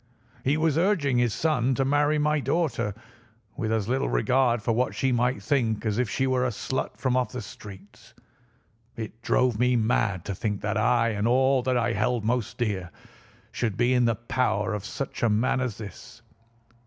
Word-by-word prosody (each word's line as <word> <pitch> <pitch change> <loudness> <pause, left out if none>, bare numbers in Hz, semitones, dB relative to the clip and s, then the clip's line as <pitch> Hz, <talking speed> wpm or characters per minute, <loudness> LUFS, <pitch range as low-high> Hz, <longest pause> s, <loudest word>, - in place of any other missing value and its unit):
He 140 +3 +2
was 160 -1 +2
urging 160 -9 +2
his 120 -2 +2
son 135 -2 +1
to 135 - +1
marry 145 +2 +2
my 150 0 +2
daughter 125 - -1 0.6
with 110 -5 -2
as 110 -3 0
little 125 - 0
regard 120 - +2
for 115 - +1
what 125 +3 0
she 135 - +1
might 125 +2 0
think 115 -7 0
as 105 +1 0
if 125 -4 0
she 135 - 0
were 130 -1 +1
a 130 - +1
slut 130 +3 -4
from 130 -2 0
off 125 -4 0
the 125 - -4
streets. 105 +2 -13 0.8
It 115 0 -7
drove 125 -2 +1
me 125 0 +3
mad 110 -5 +1
to 100 - -3
think 105 +1 -3
that 105 +1 -2
I 115 +2 +2
and 105 0 -1
all 130 +2 +3
that 125 0 0
I 120 0 +1
held 110 +2 0
most 120 -1 -1
dear 100 -7 -2 0.6
should 110 -6 -2
be 125 +1 +3
in 125 -1 +3
the 115 -1 +2
power 110 -3 -1
of 105 -1 -4
such 135 +4 -5
a 120 - +3
man 115 +5 +1
as 125 -6 -3
this. 105 -4 -11
120 Hz, 190 wpm, -26 LUFS, 110-130 Hz, 0.8 s, me